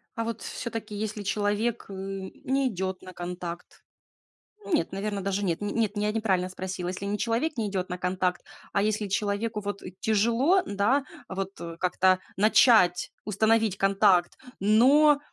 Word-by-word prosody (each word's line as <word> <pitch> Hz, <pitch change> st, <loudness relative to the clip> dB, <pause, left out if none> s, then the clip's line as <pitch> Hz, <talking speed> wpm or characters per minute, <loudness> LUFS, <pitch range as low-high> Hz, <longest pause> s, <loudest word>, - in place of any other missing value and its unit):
А 230 Hz, -, -1 dB
вот 230 Hz, -1 st, -4 dB
всё-таки, 225 Hz, -3 st, -5 dB
если 210 Hz, 0 st, -4 dB
человек, 210 Hz, +3 st, -1 dB
э, 195 Hz, -, -7 dB
не 195 Hz, +8 st, -2 dB
идёт 190 Hz, -3 st, -4 dB
на 185 Hz, -, -11 dB
контакт? 175 Hz, 0 st, -7 dB, 0.8 s
Нет, 330 Hz, -6 st, 0 dB
наверное, 200 Hz, +1 st, -3 dB
даже 195 Hz, +1 st, -1 dB
нет, 170 Hz, -4 st, 0 dB
нет, 210 Hz, +1 st, 0 dB
я 210 Hz, +1 st, +1 dB
неправильно 195 Hz, -5 st, 0 dB
спросила. 185 Hz, -1 st, -5 dB
Если 185 Hz, +2 st, -5 dB
не 205 Hz, +1 st, -1 dB
человек 240 Hz, +8 st, -1 dB
не 220 Hz, -2 st, 0 dB
идёт 190 Hz, -2 st, -3 dB
на 180 Hz, -, -3 dB
контакт, 180 Hz, 0 st, -1 dB, 0.3 s
а 200 Hz, -, +1 dB
если 215 Hz, 0 st, 0 dB
человеку 205 Hz, +2 st, -1 dB
вот, 205 Hz, 0 st, -5 dB
э, 185 Hz, -, -7 dB
тяжело, 235 Hz, -, +3 dB
н-да, 215 Hz, -, +1 dB, 0.2 s
вот, 195 Hz, 0 st, -5 dB
э, 170 Hz, -1 st, -6 dB
как-то 185 Hz, 0 st, +3 dB, 0.2 s
начать, 205 Hz, -3 st, +5 dB
установить 220 Hz, 0 st, +2 dB
контакт, 195 Hz, -2 st, +3 dB, 0.2 s
но, 275 Hz, +9 st, +5 dB
205 Hz, 155 wpm, -27 LUFS, 190-225 Hz, 0.8 s, начать